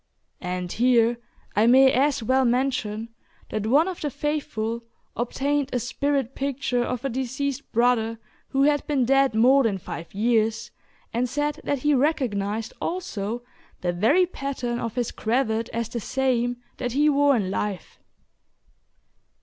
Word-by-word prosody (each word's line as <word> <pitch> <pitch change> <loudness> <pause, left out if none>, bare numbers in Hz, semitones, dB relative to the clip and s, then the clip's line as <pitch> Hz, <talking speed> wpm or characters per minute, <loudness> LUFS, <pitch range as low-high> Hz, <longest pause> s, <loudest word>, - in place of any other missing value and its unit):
And 180 -1 -3
here 240 -1 +3 0.4
I 215 +2 +4
may 265 +2 +7
as 275 -1 +2
well 260 +4 +3
mention 240 -3 0 0.4
that 215 0 -2
one 290 +9 +4
of 370 -2 -5
the 295 - -1
faithful 235 -6 -3 0.3
obtained 275 +4 -1
a 250 - 0
"spirit" 270 +1 -1
picture 270 -3 -1
of 250 +1 -3
a - - +3
deceased 265 +2 -3
brother 230 -1 +2 0.3
who 275 0 +1
had 290 0 +2
been 275 -4 +1
dead 270 -1 +3
more 255 +5 +5
than 220 -6 +1
five 170 -2 -8
years, 225 0 +1 0.4
and 245 +2 0
said 295 +3 -2
that 280 -3 -1
he 295 - +4
recognized 225 -7 0
also 240 - -3 0.4
the 175 -1 0
very 270 - +4
pattern 265 -7 -4
of 230 -2 -4
his 245 -2 -1
cravat 225 -1 0
as 230 0 -2
the 235 +1 -4
same 245 0 0 0.2
that 245 -2 -3
he 295 +3 +3
wore 285 -1 +4
in 195 -5 -1
life. 195 -2 -4
245 Hz, 150 wpm, -25 LUFS, 225-275 Hz, 0.4 s, may